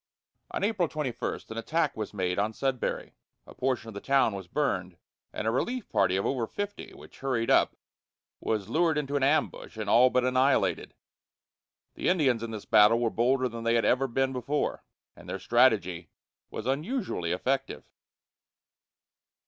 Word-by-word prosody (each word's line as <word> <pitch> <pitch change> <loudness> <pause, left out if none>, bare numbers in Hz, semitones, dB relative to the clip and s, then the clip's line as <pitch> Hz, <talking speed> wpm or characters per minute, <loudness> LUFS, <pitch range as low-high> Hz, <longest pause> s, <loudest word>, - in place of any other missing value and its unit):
On - - -4
April 200 -5 +1
21 150 -6 -3
an 110 0 -4
attack 165 +8 0
was 110 -2 -4
made 90 -2 -1
on 105 +2 0
Sudbury; 130 +1 -2 0.3
a - - -13
portion 130 -3 -1
of - - -9
the 100 - -7
town 135 -5 +3
was 95 -2 -7
burned, 90 -9 -2 0.3
and - - -5
a 110 - +2
relief 240 - -2
party 100 -4 +2
of 95 - 0
over 120 -4 -1
fifty 205 - -5
which - - -15
hurried 125 -4 0
up - - +4 0.6
was 105 -4 -2
lured 165 -1 +2
into 145 -1 -2
an 140 - +1
ambush 140 -4 0
and 110 - -2
all 125 +2 +6
but 125 0 +1
annihilated. 130 +2 +1 1.0
The - - -1
Indians 140 -10 +2
in 115 - -4
this 110 -2 -7
battle 110 +1 +5
were 115 -2 0
bolder 130 +2 +2
than 115 -1 -7
they 115 0 +2
had 115 - +2
ever 135 +2 +2
been 135 +2 0
before, 135 +4 -2 0.3
and - - -13
their - - -3
strategy 95 -6 +2 0.4
was 110 - -6
unusually 145 - -2
effective. 135 +9 -2
125 Hz, 165 wpm, -28 LUFS, 110-140 Hz, 1.0 s, all